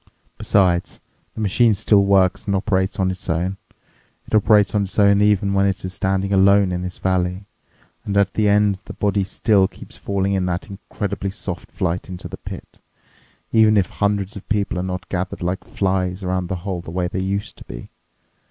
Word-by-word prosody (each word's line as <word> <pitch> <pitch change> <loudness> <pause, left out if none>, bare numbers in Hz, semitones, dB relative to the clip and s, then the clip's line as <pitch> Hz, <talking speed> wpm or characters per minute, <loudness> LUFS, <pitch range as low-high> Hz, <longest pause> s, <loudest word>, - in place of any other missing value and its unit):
Besides, 90 -3 +1 0.4
the 110 - -5
machine 110 +2 +3
still 100 +1 +4
works 95 -1 +2
and 100 - +1
operates 95 0 0
on 95 -1 +2
its 90 - -8
own. 90 +4 -1 0.7
It - - -14
operates 105 -1 +4
on 105 -2 +1
its 95 - -7
own 100 -1 +5
even 105 -1 +2
when 100 0 +3
it 95 0 -2
is 95 - -5
standing 95 +1 -1
alone 100 0 +5
in 90 0 -2
this 90 0 -5
valley. 95 +1 -1 0.6
And 100 0 -2
at 100 -1 +2
the 105 -1 +2
end, 105 -1 +3
the - - -8
body 100 -1 0
still 95 0 +2
keeps - - -13
falling 100 0 -1
in 95 -2 0
that 90 0 -3
incredibly 100 +1 -4
soft 95 - -6
flight 90 +2 -2
into 90 -1 -7
the - - -8
pit, - - -10 0.7
even 110 -1 +5
if 95 -3 +1
hundreds 100 -1 -1
of 100 - -10
people 100 -3 0
are - - -1
not 90 +1 -4
gathered 90 -1 -3
like 90 +2 -2
flies 95 -1 -1
around 90 -1 -1
the 95 - -3
hole 95 -4 -3
the 85 - -10
way 90 +1 -1
they 90 - -4
used 100 +2 -3
to - - -10
be. - - -9
95 Hz, 195 wpm, -21 LUFS, 90-100 Hz, 0.7 s, own